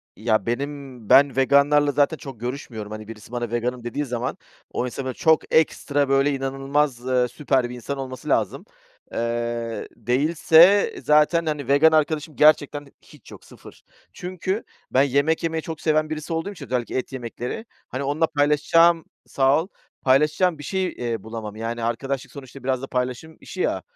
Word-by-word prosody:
Ya, 110 0 0
benim 135 -2 -5
ben 140 -1 +6
veganlarla 140 +2 +4
zaten 145 +3 +2
çok 135 -6 -10
görüşmüyorum. 120 -4 -6
Hani, 110 0 -7
birisi 110 0 -11
bana 120 -2 -3
"veganım" 120 +1 -2
dediği 120 +5 -3
zaman, 125 -1 -3 0.3
o - - -2
insanın 130 +1 -4
çok 160 +3 +2
ekstra, 145 -3 +2
böyle, 135 +1 +3
inanılmaz, 135 -1 -1
eee, 125 -1 +2
süper 130 0 0
bir 125 - -7
insan 125 +4 -5
olması 130 -2 -7
lazım. - - 0 0.5
Eee, 115 0 -3
değilse 165 - +4
zaten, 150 +3 +3
hani, 150 -4 -3
vegan 145 +4 +5
arkadaşım 155 0 0
gerçekten 145 -1 +3
hiç - - -17
yok - - -13
0. - - -15 0.3
Çünkü 185 +3 -4 0.3
ben 130 - +4
yemek 140 +4 +1
yemeyi 165 -1 -1
çok 160 0 -7
seven 155 -1 +1
birisi 155 +1 -4
olduğum 165 +5 -2
için 165 -8 -9
özellikle 125 -1 -2
et 130 - -4
yemekleri, 125 - -5 0.2
hani, 130 +2 -4
onunla 145 +4 +1
paylaşacağım 150 +3 +3 0.2
Sağ 135 +3 +3
ol, - - -12 0.3
paylaşacağım 150 +6 +3
bir 145 - -10
şey, 190 +4 -1
eee, 115 - -4
bulamam. 110 -2 -7
Yani 115 +1 -4
arkadaşlık 130 +3 -3
sonuçta 135 -1 -11
biraz 130 -1 -1
da 135 - -6
paylaşım 130 +5 -3
işi - - -7
ya. - - 0
140 Hz, 165 wpm, -23 LUFS, 125-155 Hz, 0.5 s, ben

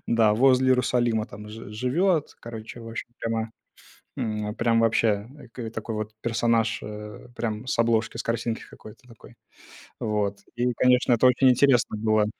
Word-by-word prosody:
Да, 110 -2 +3
возле 130 +2 +4
Иерусалима, 120 -3 +2
там, 105 +1 -10
ж 110 -1 -9
живет, 150 - 0
короче, 115 0 -8
в 115 - -9
общем, 115 - -6
прямо, 115 0 -2 0.7
м, 105 -1 -3
прям 115 -1 +2
вообще, 110 -2 +2 0.2
и - - -16
к 115 - -21
э, 115 -2 -4
такой 110 0 -5
вот 110 0 -4
персонаж, 115 -1 +1
э, 105 +1 -8
прям 110 +1 -3
с 130 - -2
обложки, 115 -2 +1
с - - -2
картинки 115 0 -2
какой-то 110 +4 -14
такой. 115 -2 -16 0.6
Вот, 105 -2 -1 0.2
и 125 +1 +1
конечно, 125 +1 +3
это 120 +2 +4
очень 130 +1 +5
интересно 125 -3 +3
было. 110 -1 +2
115 Hz, 165 wpm, -25 LUFS, 110-120 Hz, 0.7 s, очень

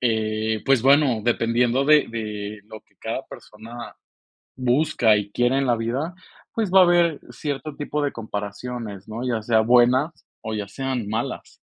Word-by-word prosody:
eh, 110 -2 0
pues 135 -4 +4
bueno, 135 -3 +4
dependiendo 120 +2 +2
de 150 0 +5
de 105 -2 -5
lo 110 - -9
que - - -36
cada - - -3
persona 115 +3 -10 0.6
busca 125 -3 +3
y 105 -1 -3
quiere 120 +3 +2
en 135 - 0
la 120 -2 +2
vida, 130 +10 -3 0.4
pues 220 -4 -1
va 190 - +8
a - - +9
haber 170 -3 +3
cierto 145 0 -5
tipo 150 0 -3
de 145 - 0
comparaciones, 105 0 -6
¿no? 115 +4 -5
Ya 120 -3 0
sea 110 0 +3
buenas 125 +6 +3 0.2
o 110 - -2
ya 105 -2 -4
sean 130 -1 -3
malas. 110 +2 -4
120 Hz, 165 wpm, -23 LUFS, 110-135 Hz, 0.6 s, a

